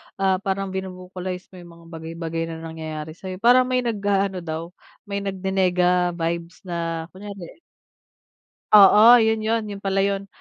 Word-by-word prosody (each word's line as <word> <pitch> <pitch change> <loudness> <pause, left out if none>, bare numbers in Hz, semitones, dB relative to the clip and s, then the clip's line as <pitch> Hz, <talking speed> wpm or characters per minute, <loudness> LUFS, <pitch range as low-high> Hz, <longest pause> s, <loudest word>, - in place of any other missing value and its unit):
ah, 190 -1 +1
parang 195 -1 -3
vino-vocalize 185 -1 -6
mo - - -15
yung 175 -1 -13
mga 170 0 -18
bagay-bagay 165 0 -5
na 165 0 -7
nangyayari 160 -1 -6
sayo, 185 +3 -8
parang 250 +1 +6
may 255 -1 0
nag-aano 200 -4 0
daw 165 +1 -6 0.3
may 200 -2 -4
nagni-nega-vibes, 180 -3 0
na 170 -2 -3
kunyari 200 - -10 1.2
Oo 210 +4 +9
yun 220 0 +1
yun, 225 +1 0
yun 200 - -7
pala 195 0 0
yun. 200 0 -1
185 Hz, 140 wpm, -23 LUFS, 170-200 Hz, 1.2 s, Oo